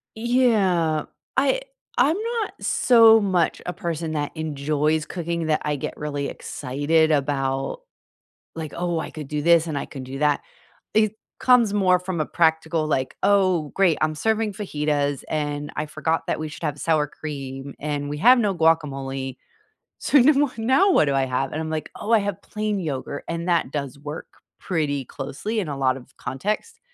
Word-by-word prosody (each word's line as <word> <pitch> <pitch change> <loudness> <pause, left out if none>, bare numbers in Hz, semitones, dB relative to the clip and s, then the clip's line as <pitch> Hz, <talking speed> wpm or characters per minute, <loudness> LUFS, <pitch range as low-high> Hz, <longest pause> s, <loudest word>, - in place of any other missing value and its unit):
Yeah. 205 - +2 0.3
I 280 - +3 0.4
I'm 285 +7 +4 0.3
not 420 - -4
so 225 -2 +6
much 185 -5 +1
a 180 - -3
person 165 -1 -3
that 145 -1 -2
enjoys 150 0 0
cooking 170 -2 -3
that 155 - +1
I 150 -1 0
get 135 - -5
really 145 -1 -3
excited 150 +4 0
about, 135 - -1 0.7
like, 160 -2 -6
"Oh, 175 -1 -1
I - - -5
could 155 -3 -7
do 150 -1 -2
this 170 0 +5
and 155 -3 -3
I - - -5
could 135 -3 -8
do 135 +1 -7
that," 150 -1 +3 0.5
it 215 0 +3 0.2
comes 245 -5 +5
more 185 -3 +4
from 180 -2 -4
a 155 - 0
practical, 160 -1 +1
like, 130 -4 -1
"Oh, 185 -7 +3
great. 185 -5 +3
I'm 155 0 +1
serving 220 +5 0
fajitas, 150 - -1
and 145 -1 -2
I 150 - -2
forgot 160 +2 -1
that - - 0
we 155 - -3
should 150 - -11
have 150 -2 -2
sour 155 -1 +2
cream, 140 -3 -7
and 145 -1 -3
we 150 0 -4
have 250 +8 +7
no 205 -4 +1
guacamole. 135 -5 0 0.6
So - - +1
nu 275 +5 +6
w 285 0 +2
now 265 - +4
what 155 - +5
do 140 - +1
I 135 -1 +2
have?" 130 +1 -1
And 155 - -2
I'm 160 - -3
like, 155 -1 -3
"Oh, 225 - -3
I 225 - +7
have 200 -3 -3
plain 210 -2 -2
yogurt," 145 -3 -4
and 170 +1 -3
that 170 -6 +2
does 140 -1 -4
work 150 +2 -7 0.3
pretty 145 -6 -1
closely 145 - -4
in 175 - -4
a 140 - -3
lot 130 -1 +1
of 135 +1 -17
context. 215 - -3
160 Hz, 180 wpm, -23 LUFS, 145-195 Hz, 0.7 s, have